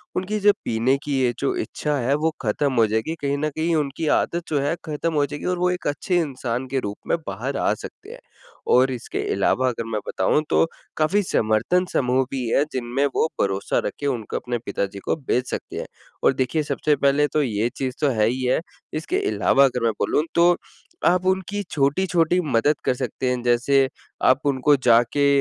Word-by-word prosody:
उनकी 200 +4 -1
जो 205 0 +6
पीने 120 +4 +2
की 145 - -3
ये 120 -1 +2
जो 385 - 0
इच्छा 150 - -2
है 130 +2 +1
वो 160 +2 +1
खत्म 135 +5 0
हो 115 -2 +5
जाएगी 110 +9 -1
कहीं 140 0 0
न 155 +1 -1
कहीं 160 +3 -1
उनकी 150 +1 -1
आदत 170 +3 +1
जो 145 -2 +1
है 145 +4 0
खत्म 160 +2 -2
हो 145 -2 +2
जाएगी 145 +1 -7
और 180 -1 0
वो 180 0 +2
एक 180 - -3
अच्छे 160 +5 0
इंसान 130 -4 -3
के 135 +1 -1
रूप 105 -4 -5
में - - +2
बाहर 125 +8 -3
आ - - +2
सकते - - -10
हैं। - - -10 0.5
और 130 +1 +5
इसके 125 -2 -5
अलावा 130 0 +2
अगर 115 -1 -4
मैं 110 - 0
बताऊँ 95 +10 +1
तो, - - +4 0.3
काफ़ी 165 +7 +2
समर्थन 115 +8 +1
समूह 130 0 +2
भी 130 -3 -2
है 140 - +3
जिनमें 125 +2 -1
वो - - +3
भरोसा 95 0 0
रख - - -2
के 145 - -2
उनको 120 -6 -2
अपने 120 -1 -3
पिताजी 100 0 -3
को - - +1
भेज 130 -4 -1
सकते - - -5
हैं। - - -4 0.4
और - - +5
देखिए 135 +4 0
सबसे 150 0 +1
पहले 140 +2 +3
तो 155 - +3
ये 115 -1 0
चीज़ 130 -2 -2
तो 145 - +3
है 110 -2 +2
ही 130 +2 -1
है, 125 +4 +2 0.3
इसके 330 - -1
अलावा 140 - +4
अगर 125 -3 -1
मैं 115 - +3
बोलूँ 150 - +1
तो 175 +1 +5 0.5
आप 180 +1 +3
उनकी 190 +2 0
छोटी-छोटी 165 +4 +2
मदद 125 +6 +3
कर 130 - +3
सकते 130 0 -3
हैं 125 -1 -1
जैसे, 130 +3 +3 0.4
आप 130 +1 +5
उनको 140 +1 +3
जाके 125 +2 +3
140 Hz, 205 wpm, -23 LUFS, 125-155 Hz, 0.5 s, जो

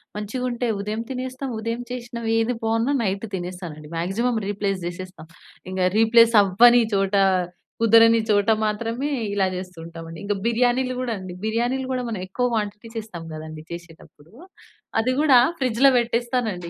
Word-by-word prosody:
మంచిగుంటే, 245 +3 -3
ఉదయం 210 +2 -3
తినేస్తాం. 260 +1 -4
ఉదయం 230 +2 -3
చేసినవి 235 -2 -4
ఏది 225 +2 +1
బావున్నా 225 +4 +1
నైటు 195 +2 -2
తినేస్తానండి. 175 -4 -7
Maximum 220 +8 0
replace 200 -1 -2
చేసేస్త. 180 +2 -7 0.5
ఇంక 185 - -4 0.2
రీప్లేస్ 230 +1 +5
అవ్వని 235 +5 +6
చోట, 195 0 +1 0.7
కుదరని 230 0 +6
చోట 205 +1 +3 0.2
మాత్రమే 230 +5 -2 0.3
ఇలా 195 -2 +2
చేస్తూ 180 -1 -7
ఉంటామండి. 165 -1 -9
ఇంక 205 - 0
బిర్యానీలు 245 +2 +1
కూడా 250 -2 -2
అండి. 185 -1 -8
బిర్యానీలు 240 +4 -1
కూడా 250 -1 -2
మనం 215 -4 -4
ఎక్కువ 245 +7 -1
క్వాంటిటీ 210 0 -3
చేస్తాం 215 -7 -7
కదండీ! 155 0 -8
చేసేటప్పుడు. 165 -2 -12 0.7
అది 250 +3 0
కూడా 275 -5 +6 0.2
ఫ్రిడ్జ్‌లో 260 +1 +4
పెట్టేస్తానండి. 235 -6 -1
225 Hz, 135 wpm, -23 LUFS, 190-240 Hz, 0.7 s, అవ్వని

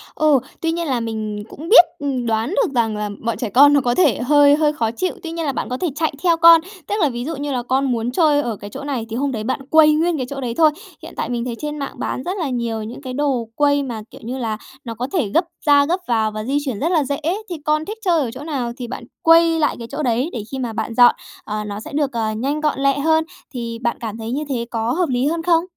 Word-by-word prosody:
Ừ, 305 -3 +4 0.2
tuy 330 - 0
nhiên 335 0 -2
là 260 -4 0
mình 215 -2 -4
cũng 320 +4 -9
biết, 430 -6 +9
ừ, 285 - -3 0.2
đoán 225 +2 0
được 395 - 0
rằng 225 -3 +1
là 210 0 -3 0.2
bọn 230 - -1
trẻ 235 - -3
con 285 +7 +6
nó 285 - +4
có 245 -1 0
thể 295 - +3
hơi 285 +2 +5
hơi 300 -1 +2
khó 225 -6 -1
chịu. 365 +11 -2
Tuy 330 - -5
nhiên 330 -1 -3
là 285 - 0
bạn - - -4
có 250 - -2
thể 355 - -1
chạy 315 0 0
theo 340 -2 +3
con, 335 0 +8 0.3
tức 410 - -1
là 305 - +3
ví 240 -1 -5
dụ 325 +2 -3
như 285 +1 -4
là 250 -2 -2
con 260 +2 0
muốn 235 0 -1
chơi 295 0 +3
ở 235 -6 -3
cái 205 0 -9
chỗ 210 - -8
này 270 -6 -3
thì 225 - -4
hôm 275 +3 -1
đấy 220 -4 -4
bạn 260 +5 -2
quây 310 0 +6
nguyên 330 +2 +1
cái 260 - -2
chỗ 275 -1 -5
đấy 240 -3 -3
thôi. 315 -2 +5 0.3
Hiện - - -10
tại - - -2
mình 240 -1 -2
thấy 240 -2 -3
trên 300 0 -4
mạng 275 - -4
bán 255 - -3
rất 365 +6 -3
là 330 -7 -2
nhiều 235 -3 -2
những 225 +5 -8
cái 260 -2 -6
đồ 265 -4 0
quây 285 -1 +2
mà, 235 -5 -5
kiểu - - -13
như 245 +4 -4
là, 225 -4 -2 0.3
nó 230 - -5
có 245 +3 -3
thể 310 - +1
gấp 330 - +2 0.2
ra 285 -1 +5
gấp 350 +5 0
vào 220 -2 +1
và 215 0 -5
di 270 +5 0
chuyển 250 -7 -3
rất 320 - 0
là 320 -4 +3
dễ. 280 +1 -3 0.3
Thì 350 - -3
con 305 +1 +1
thích 425 +5 -6
chơi 345 -3 +3
ở 245 -5 -2
chỗ 260 +4 -9
nào 270 -6 -3
thì 245 -3 -5
bạn 245 - -7 0.2
quây 330 0 +5
lại 300 - +1
cái 230 - -7
chỗ 295 +2 -3
đấy 250 +4 +1
để 230 -5 -4
khi 265 - -4
mà 240 -3 -3
bạn 220 +1 -3
dọn, 245 0 +7 0.3
ờ, 210 0 -4
nó 205 -1 -5
sẽ 220 - -9
được, 290 -2 0
ờ, 225 -3 -1
nhanh 270 +8 -2
gọn 300 -3 0
lẹ 275 0 +2
hơn. 320 +2 +3 0.3
Thì 230 -2 -5
bạn 235 0 -1
cảm 220 -2 -5
thấy 225 0 -5
như 285 +4 -2
thế 240 -4 -2
có 230 0 -1
hợp 345 +2 0
lý 250 0 0
hơn 325 +2 -1
không? 335 -1 +3
270 Hz, 290 wpm, -20 LUFS, 235-305 Hz, 0.3 s, biết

